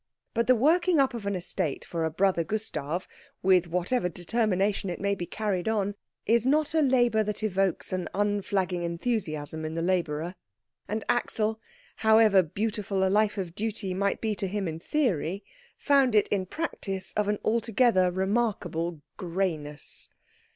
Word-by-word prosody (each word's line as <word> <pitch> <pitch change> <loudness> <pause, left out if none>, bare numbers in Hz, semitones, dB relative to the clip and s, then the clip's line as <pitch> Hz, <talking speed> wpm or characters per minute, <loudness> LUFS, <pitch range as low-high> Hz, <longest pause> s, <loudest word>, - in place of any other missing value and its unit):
But 230 -1 +1
the 255 - +6
working 330 +6 +3
up 270 -2 +3
of 225 -4 -5
an 200 - 0
estate 170 -5 -3
for 165 -2 -2
a - - +1
brother 180 +1 +2
Gustav, 180 -4 -3 0.4
with 185 -2 +4
whatever 180 +4 0
determination 195 +2 0
it 175 - -4
may 200 +1 +1
be 175 -3 -4
carried 205 -4 -2
on, 205 -2 0 0.3
is 230 0 +3
not 295 +4 +2
a 320 - +3
labour 245 -5 +3
that 210 0 -3
evokes 195 -3 0
an 185 -1 -2
unflagging 200 -3 0
enthusiasm 170 -4 -2
in 155 +1 -4
the 165 - -1
labourer; 170 -2 0 0.5
and 215 +1 -2
Axel, 220 -2 0 0.4
however 220 -3 +6
beautiful 195 +2 -1
a - - 0
life 210 0 +2
of 180 -4 -4
duty 205 -2 -3
might 200 +2 0
be 220 -1 0
to 195 -1 -2
him 195 0 -2
in 160 0 -4
theory, 195 - -1 0.3
found 275 -5 +3
it, 210 - +4
in 190 -2 0
practice, 195 - -4
of 210 -1 0
an 210 0 +1
altogether 225 -4 +3
remarkable 190 -5 -1
greyness. 165 -6 -3
200 Hz, 160 wpm, -28 LUFS, 180-220 Hz, 0.5 s, the